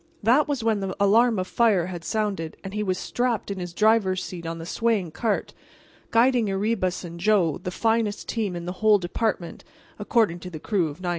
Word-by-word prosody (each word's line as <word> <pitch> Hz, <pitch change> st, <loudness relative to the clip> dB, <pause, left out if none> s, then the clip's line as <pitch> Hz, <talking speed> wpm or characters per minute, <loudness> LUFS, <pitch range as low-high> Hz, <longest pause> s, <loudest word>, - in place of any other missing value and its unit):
That 250 Hz, +8 st, +4 dB
was 280 Hz, -5 st, -2 dB
when 220 Hz, -2 st, +1 dB
the 195 Hz, -1 st, -3 dB
alarm 220 Hz, +3 st, +4 dB
of 185 Hz, -, -1 dB
fire 205 Hz, -4 st, +2 dB
had 175 Hz, -2 st, -6 dB
sounded 200 Hz, -7 st, -2 dB
and 195 Hz, 0 st, -7 dB
he 210 Hz, -, -2 dB
was 185 Hz, -3 st, -1 dB
strapped 240 Hz, -2 st, -1 dB
in 195 Hz, -, -4 dB
his 175 Hz, -1 st, -5 dB
driver's 195 Hz, -1 st, +2 dB
seat 170 Hz, -2 st, -7 dB
on 165 Hz, 0 st, -4 dB
the 165 Hz, -, -7 dB
swaying 210 Hz, -3 st, 0 dB
cart, 215 Hz, +5 st, -2 dB, 0.6 s
guiding 235 Hz, -1 st, +3 dB
Erebus 195 Hz, -2 st, -1 dB
and 170 Hz, -1 st, -8 dB
Joe, 180 Hz, -6 st, +2 dB
the 180 Hz, -, -5 dB
finest 225 Hz, +2 st, 0 dB
team 210 Hz, -6 st, -2 dB
in 170 Hz, 0 st, -5 dB
the 180 Hz, -, -3 dB
whole 215 Hz, -1 st, +6 dB
department—according 200 Hz, +1 st, -2 dB
to 180 Hz, -, -8 dB
the 165 Hz, -, -7 dB
crew 185 Hz, -1 st, 0 dB
of 150 Hz, +4 st, -9 dB
99. 180 Hz, -, -2 dB
200 Hz, 200 wpm, -25 LUFS, 180-225 Hz, 0.6 s, whole